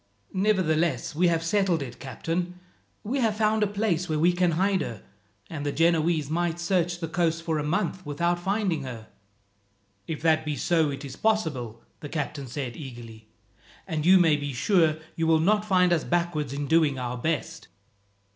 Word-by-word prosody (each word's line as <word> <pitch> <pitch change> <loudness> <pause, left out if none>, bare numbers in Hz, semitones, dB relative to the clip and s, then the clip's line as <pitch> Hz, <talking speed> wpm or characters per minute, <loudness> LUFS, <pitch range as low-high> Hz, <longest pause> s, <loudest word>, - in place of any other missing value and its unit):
"Nevertheless 170 - +1
we 175 +4 +3
have 165 -1 +1
settled 175 -3 +1
it, 120 -2 -9
captain. 170 +8 -4 0.4
We 255 +7 -2
have 220 -4 +1
found 215 0 +2
a 210 - +3
place 195 -4 -1
where 155 - 0
we 170 +3 +3
can 175 -1 +2
hide 190 +3 +1
her, 110 -4 -6 0.4
and 150 -3 -6
the 145 - -1
Genoese 165 -1 +2
might 170 +2 -1
search 175 0 0
the 165 - -3
coast 165 0 0
for 160 -2 -1
a - - -2
month 185 +4 -1
without 170 +4 -1
finding 190 -3 0
her." 120 -5 -8 1.0
"If 160 -1 -5
that 160 -1 +3
be 150 -1 -2
so 160 0 +2
it 140 0 -6
is 135 - -8
possible," 145 - -1 0.2
the 145 - -8
captain 145 -3 -4
said 125 -1 -5
eagerly, 120 -6 -10 0.6
"and 160 -5 -2
you 185 +3 +7
may 165 -4 +4
be 145 -1 -4
sure 160 - +2 0.2
you 165 -1 0
will 160 -1 +4
not 210 +5 +2
find 180 -3 +3
us 160 - +1
backward 170 -5 -1
in 140 +1 -3
doing 155 -2 +3
our 125 -1 -3
best." 165 +3 -3
165 Hz, 180 wpm, -26 LUFS, 145-180 Hz, 1.0 s, you